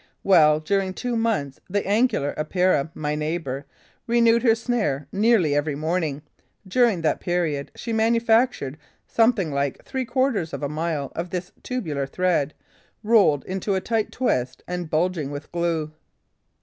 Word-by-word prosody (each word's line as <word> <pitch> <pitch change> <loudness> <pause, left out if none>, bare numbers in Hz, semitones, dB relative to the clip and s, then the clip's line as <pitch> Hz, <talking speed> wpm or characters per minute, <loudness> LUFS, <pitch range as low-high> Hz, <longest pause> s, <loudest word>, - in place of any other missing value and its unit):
Well, 155 -5 +5
during 190 +3 -1
two 245 -1 -2
months, 220 -13 -1
the 205 +2 -1
Angular 205 - +1
Epeira, 160 -1 +1
my 150 -1 -2
neighbour, 150 -3 -3 0.4
renewed 235 0 +4
her 230 -3 +4
snare 220 - -1
nearly 200 -7 +3
every 145 +1 0
evening. 155 -1 -2 0.4
During 225 -3 +3
that 160 - +1
period, 165 -5 -1
she 230 - -5
manufactured 225 - +2 0.3
something 225 -8 +2
like 140 -1 -2
three 260 -1 -3
quarters 250 - 0
of - - -5
a - - +1
mile 155 -2 -2
of 170 +2 -3
this 180 +1 -4
tubular 155 - -3
thread, 165 -2 0 0.5
rolled 205 -10 +4
into 190 +1 -2
a - - +1
tight 220 +2 -1
twist 130 - -1
and 180 -2 -4
bulging 160 -2 0
with 145 +1 -7
glue. 170 -3 -1
180 Hz, 145 wpm, -24 LUFS, 150-225 Hz, 0.5 s, Well